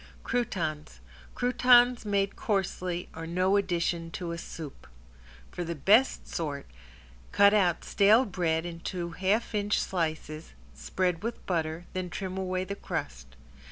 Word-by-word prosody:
~CROUTONS~ 160 Hz, -, -2 dB, 0.4 s
Croutons 245 Hz, -1 st, +4 dB
made 200 Hz, -1 st, 0 dB
coarsely 185 Hz, -3 st, -2 dB
are 165 Hz, 0 st, -7 dB
no 185 Hz, +3 st, +2 dB
addition 170 Hz, -3 st, 0 dB
to 170 Hz, 0 st, -5 dB
a 170 Hz, -, -4 dB
soup. 155 Hz, -4 st, -9 dB, 0.6 s
For 175 Hz, -, -4 dB
the 170 Hz, 0 st, -4 dB
best 215 Hz, -, +3 dB
sort, 145 Hz, -4 st, -4 dB, 0.7 s
cut 200 Hz, 0 st, +6 dB
out 180 Hz, -5 st, +2 dB
stale 215 Hz, +6 st, +5 dB
bread 170 Hz, -5 st, -1 dB
into 170 Hz, 0 st, -5 dB
half 195 Hz, +7 st, 0 dB
inch 205 Hz, 0 st, +1 dB
slices, 155 Hz, -3 st, -3 dB, 0.2 s
spread 180 Hz, -2 st, -1 dB
with 230 Hz, +1 st, -5 dB
butter, 165 Hz, -1 st, -2 dB
then 185 Hz, -1 st, -3 dB
trim 185 Hz, +1 st, -5 dB
away 185 Hz, -1 st, -1 dB
the 195 Hz, +2 st, -4 dB
crust. 65 Hz, -, -6 dB
180 Hz, 130 wpm, -29 LUFS, 165-200 Hz, 0.7 s, cut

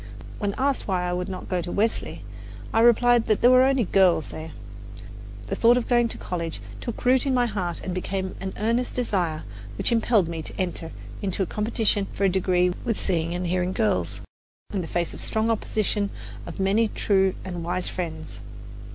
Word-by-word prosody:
When 200 Hz, -2 st, -1 dB
asked 275 Hz, +1 st, 0 dB
why 185 Hz, -3 st, 0 dB
I 180 Hz, -, -1 dB
would 180 Hz, +2 st, -2 dB
not 185 Hz, -1 st, -6 dB
go 180 Hz, -2 st, 0 dB
to 175 Hz, +1 st, -5 dB
Wellesley, 220 Hz, +3 st, -1 dB, 0.5 s
I 225 Hz, -, +3 dB
replied 240 Hz, 0 st, +5 dB
that 215 Hz, -, +2 dB
there 245 Hz, -, +7 dB
were 255 Hz, 0 st, +7 dB
only 265 Hz, -1 st, +3 dB
girls 185 Hz, -5 st, +3 dB
there. 160 Hz, 0 st, -7 dB, 0.9 s
The -, -, -3 dB
thought 235 Hz, +1 st, +5 dB
of 245 Hz, -, -1 dB
going 240 Hz, -1 st, +3 dB
to -, -, -5 dB
college 170 Hz, -2 st, -4 dB, 0.2 s
took 235 Hz, -, -6 dB
root 255 Hz, +2 st, +4 dB
in 265 Hz, -, +2 dB
my 245 Hz, -1 st, +3 dB
heart 185 Hz, -7 st, -3 dB
and 185 Hz, -, -3 dB
became 190 Hz, +1 st, -3 dB
an 190 Hz, 0 st, -3 dB
earnest 235 Hz, +4 st, 0 dB
desire, 180 Hz, -10 st, -1 dB, 0.3 s
which -, -, +1 dB
impelled 225 Hz, -5 st, +3 dB
me 165 Hz, -1 st, -4 dB
to -, -, -8 dB
enter 175 Hz, -3 st, -3 dB, 0.3 s
into 190 Hz, -1 st, -1 dB
competition 210 Hz, -1 st, +1 dB
for -, -, -3 dB
a 195 Hz, -, +5 dB
degree 180 Hz, -1 st, +2 dB
with 230 Hz, -, -1 dB
seeing 170 Hz, -2 st, 0 dB
and 180 Hz, +1 st, -2 dB
hearing 180 Hz, +1 st, 0 dB
girls, 95 Hz, -, 0 dB, 0.5 s
in 195 Hz, -, 0 dB
the 165 Hz, -, -5 dB
face 170 Hz, 0 st, -1 dB
of -, -, -9 dB
the -, -, -3 dB
strong 220 Hz, +1 st, +1 dB
opposition 210 Hz, -2 st, 0 dB, 0.4 s
of -, -, -8 dB
many 200 Hz, +4 st, +3 dB
true 190 Hz, -3 st, +1 dB
and 175 Hz, -3 st, -5 dB
wise 180 Hz, +2 st, -2 dB
friends. 160 Hz, -4 st, -5 dB
195 Hz, 195 wpm, -25 LUFS, 175-225 Hz, 0.9 s, there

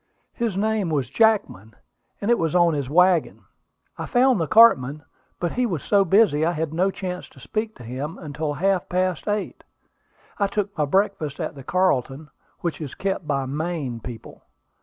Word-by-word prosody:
His 230 Hz, -6 st, -2 dB
name 215 Hz, -3 st, 0 dB
was 140 Hz, -5 st, -1 dB
Jackman, 200 Hz, -, +1 dB, 0.4 s
and 210 Hz, +3 st, 0 dB
it 240 Hz, -, +3 dB
was 165 Hz, 0 st, -1 dB
on 175 Hz, -2 st, +4 dB
his 140 Hz, -3 st, -3 dB
wagon. 180 Hz, +2 st, +3 dB, 0.6 s
I -, -, -4 dB
found 250 Hz, -5 st, +3 dB
the 160 Hz, -, -1 dB
cartman, 150 Hz, -, +5 dB, 0.4 s
but 175 Hz, -, -1 dB
he 250 Hz, 0 st, 0 dB
was 170 Hz, -, -3 dB
so 200 Hz, -1 st, +3 dB
busy 190 Hz, -5 st, +3 dB
I 170 Hz, +2 st, +1 dB
had 160 Hz, -1 st, -3 dB
no 185 Hz, +4 st, +2 dB
chance 180 Hz, -2 st, -6 dB
to -, -, -18 dB
speak 220 Hz, 0 st, -4 dB
to -, -, -12 dB
him 135 Hz, -, -5 dB
until 150 Hz, -1 st, -4 dB
half 190 Hz, +3 st, 0 dB
past 185 Hz, 0 st, -1 dB
eight. 210 Hz, 0 st, -3 dB, 0.8 s
I 200 Hz, -, +2 dB
took 200 Hz, 0 st, -3 dB
my 150 Hz, -, +1 dB
breakfast 160 Hz, -3 st, 0 dB
at -, -, -3 dB
the 135 Hz, -1 st, -11 dB
Carlton, 150 Hz, -4 st, 0 dB, 0.3 s
which 170 Hz, -2 st, -3 dB
is 145 Hz, -4 st, -6 dB
kept 190 Hz, -4 st, -3 dB
by 140 Hz, -2 st, 0 dB
Maine 145 Hz, -3 st, -3 dB
people. 115 Hz, 0 st, -10 dB
175 Hz, 180 wpm, -23 LUFS, 145-200 Hz, 0.8 s, cartman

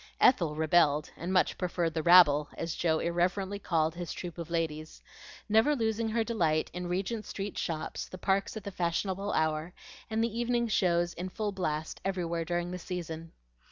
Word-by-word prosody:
Ethel 170 Hz, -, +4 dB
rebelled, 155 Hz, -1 st, +3 dB
and 175 Hz, +2 st, -4 dB
much 185 Hz, -1 st, +2 dB
preferred 175 Hz, -2 st, -1 dB
the 160 Hz, -, -1 dB
"rabble," 150 Hz, -4 st, +7 dB
as 165 Hz, -1 st, -3 dB
Joe 160 Hz, -2 st, +1 dB
irreverently 185 Hz, +4 st, 0 dB
called 160 Hz, -4 st, +1 dB
his 175 Hz, -1 st, -5 dB
troop 175 Hz, -1 st, -6 dB
of 170 Hz, -1 st, -6 dB
ladies, 155 Hz, -2 st, -3 dB, 0.4 s
never 220 Hz, +7 st, +4 dB
losing 225 Hz, -2 st, 0 dB
her 225 Hz, +1 st, +1 dB
delight 165 Hz, -9 st, 0 dB
in 180 Hz, 0 st, -4 dB
Regent 195 Hz, +5 st, -2 dB
Street 200 Hz, 0 st, -5 dB
shops, 155 Hz, -2 st, -3 dB
the 185 Hz, -, -8 dB
parks 195 Hz, +3 st, 0 dB
at 215 Hz, -, -7 dB
the 200 Hz, -, -5 dB
fashionable 185 Hz, +3 st, -1 dB
hour, 155 Hz, +2 st, 0 dB, 0.3 s
and 220 Hz, 0 st, 0 dB
the 230 Hz, 0 st, -2 dB
evening 240 Hz, 0 st, +1 dB
shows 175 Hz, -5 st, +2 dB
in 180 Hz, +2 st, -5 dB
full 210 Hz, +2 st, -2 dB
blast 160 Hz, -5 st, -3 dB
everywhere 170 Hz, -3 st, -2 dB
during 175 Hz, +1 st, -2 dB
the 180 Hz, -, -5 dB
season. 165 Hz, -3 st, -6 dB
175 Hz, 175 wpm, -30 LUFS, 165-200 Hz, 0.4 s, rabble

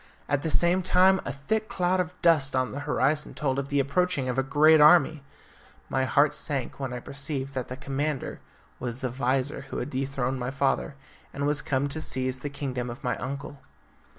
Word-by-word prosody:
At 145 Hz, -1 st, 0 dB
the 160 Hz, -, -2 dB
same 175 Hz, +7 st, +5 dB
time 185 Hz, +1 st, +4 dB
a -, -, -2 dB
thick 215 Hz, +11 st, -2 dB
cloud 185 Hz, -5 st, +1 dB
of 180 Hz, 0 st, -3 dB
dust 150 Hz, -6 st, +3 dB
on 130 Hz, 0 st, 0 dB
the 140 Hz, -, -5 dB
horizon 150 Hz, +3 st, +1 dB
told 135 Hz, -2 st, -1 dB
of 140 Hz, 0 st, -4 dB
the 145 Hz, -, +1 dB
approach 180 Hz, +7 st, +1 dB
of 130 Hz, -1 st, -1 dB
a -, -, +4 dB
great 150 Hz, +3 st, +5 dB
army. 155 Hz, -1 st, +6 dB, 0.7 s
My 130 Hz, 0 st, +1 dB
heart 145 Hz, +3 st, +3 dB
sank 140 Hz, -5 st, -3 dB
when 135 Hz, -2 st, -3 dB
I 125 Hz, -, -4 dB
perceived 140 Hz, +1 st, -4 dB
that 130 Hz, -2 st, -3 dB
the 130 Hz, -, -7 dB
commander 140 Hz, +1 st, -3 dB, 0.4 s
was 120 Hz, 0 st, -4 dB
the 130 Hz, -, -1 dB
vizir 130 Hz, +2 st, -1 dB
who -, -, -5 dB
had 130 Hz, +4 st, -4 dB
dethroned 135 Hz, -1 st, -2 dB
my 125 Hz, 0 st, -2 dB
father, 140 Hz, +1 st, 0 dB, 0.4 s
and 140 Hz, +1 st, -3 dB
was 145 Hz, 0 st, +1 dB
come 145 Hz, -2 st, 0 dB
to 155 Hz, +3 st, -5 dB
seize 130 Hz, -3 st, -2 dB
the 145 Hz, -, -5 dB
kingdom 130 Hz, -3 st, -4 dB
of 120 Hz, +4 st, -9 dB
my 125 Hz, -, 0 dB
uncle. 140 Hz, +2 st, -6 dB
140 Hz, 200 wpm, -27 LUFS, 130-155 Hz, 0.7 s, army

